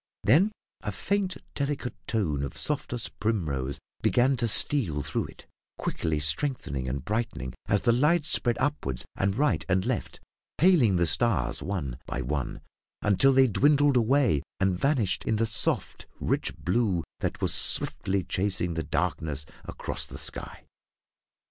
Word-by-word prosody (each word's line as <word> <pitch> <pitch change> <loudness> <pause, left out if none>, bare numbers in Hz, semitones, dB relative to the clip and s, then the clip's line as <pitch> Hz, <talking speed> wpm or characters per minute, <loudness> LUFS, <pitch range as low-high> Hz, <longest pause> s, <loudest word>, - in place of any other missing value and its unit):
Then 160 - +4 0.3
a - - -3
faint, 200 -2 -2 0.2
delicate 140 -3 -3
tone 85 -11 -1
of 70 -2 -5
softest 125 -5 -3
primrose 75 - -2 0.2
began 130 +2 +3
to 120 -1 0
steal 100 - +3
through - - -2
it, - - -13 0.3
quickly 80 -2 -2
strengthening 75 - -1
and 65 +2 -4
brightening 105 - -3
as 100 - +2
the 120 - +3
light 150 +6 +2
spread 120 -6 +1
upward 70 - -2
and 100 0 0
right 150 +2 +1
and 95 0 +1
left, - - -3 0.4
paling 155 - +4
the 85 -1 +2
stars 85 - +1
one 70 -11 -4
by 65 - -3
one, 70 +1 -3 0.4
until 105 +7 +4
they 135 0 +5
dwindled 145 +4 +3
away 125 - +3 0.2
and 95 -1 +2
vanished 135 -9 +1
in 110 - +1
the 115 +2 +1
soft, 110 - -1
rich - - -1
blue 95 -3 0 0.2
that - - -3
was - - +3
swiftly 95 -1 +5
chasing 90 -1 -2
the 80 - -2
darkness 75 -2 -2 0.2
across - - -3
the - - -9
sky. - - -4
105 Hz, 145 wpm, -27 LUFS, -, 0.4 s, they